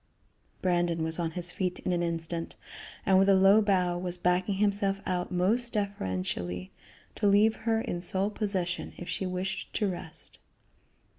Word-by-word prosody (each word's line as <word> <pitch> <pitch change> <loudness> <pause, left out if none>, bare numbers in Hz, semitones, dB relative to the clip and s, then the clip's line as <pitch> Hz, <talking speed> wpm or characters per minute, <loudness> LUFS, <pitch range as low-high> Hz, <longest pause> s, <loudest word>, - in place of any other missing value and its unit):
Brandon 175 -2 +1
was 160 +1 -1
on 170 -1 0
his 175 0 -2
feet 180 -1 -2
in 180 - -1
an 175 - 0
instant, 165 0 -3 0.5
and 190 -1 +5
with 195 +1 +4
a 195 - +7
low 195 +3 +6
bow 185 -4 +2
was 180 0 -1
backing 180 +3 +1
himself 200 -1 +1
out 180 0 -2
most 220 +7 +1
deferentially, 95 - -3 0.4
to 205 - 0
leave 210 +2 +5
her 225 -1 0
in 175 - -3
sole 190 +3 0
possession 190 -5 -2
if 175 - -8
she 190 - -2
wished 185 +1 -3
to 210 - +1
rest. 175 -3 -7
185 Hz, 160 wpm, -29 LUFS, 175-200 Hz, 0.5 s, a